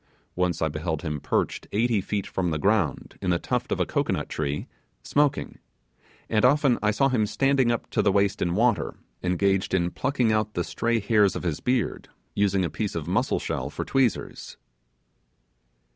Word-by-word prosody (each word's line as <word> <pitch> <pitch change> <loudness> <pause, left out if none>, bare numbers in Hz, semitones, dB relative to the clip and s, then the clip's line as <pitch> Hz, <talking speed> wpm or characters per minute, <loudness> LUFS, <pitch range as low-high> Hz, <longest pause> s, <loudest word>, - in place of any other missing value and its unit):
Once 90 -2 0
I - - +3
beheld 80 +1 -3
him 75 -3 -3
perched - - -1
eighty 110 0 +2
feet 100 +1 -2
from 90 -2 -2
the 80 - -1
ground, 95 -4 0
in 95 - -1
the 85 - +3
tuft - - -2
of - - 0
a - - +2
cocoanut - - -1
tree, 75 -1 -2 0.4
smoking; 145 -1 0 0.7
and 110 -1 +1
often 135 -1 +4
I 105 - +2
saw 135 +6 +3
him 110 -5 +1
standing 135 +1 +2
up 120 - -2
to - - +2
the 100 - +3
waist 100 0 +1
in 85 0 0
water, 115 0 +1 0.3
engaged 95 +2 +1
in 85 -1 +1
plucking 130 -4 0
out 110 0 0
the 85 - 0
stray 115 +4 0
hairs 105 -1 +3
of - - -4
his 80 -4 -1
beard, 125 -3 -1 0.2
using 100 -2 +2
a - - -2
piece 105 +3 -3
of 80 -2 -4
muscle 90 - +1
shell - - -3
for - - -5
tweezers. 130 -4 -1
100 Hz, 180 wpm, -25 LUFS, 90-120 Hz, 0.7 s, often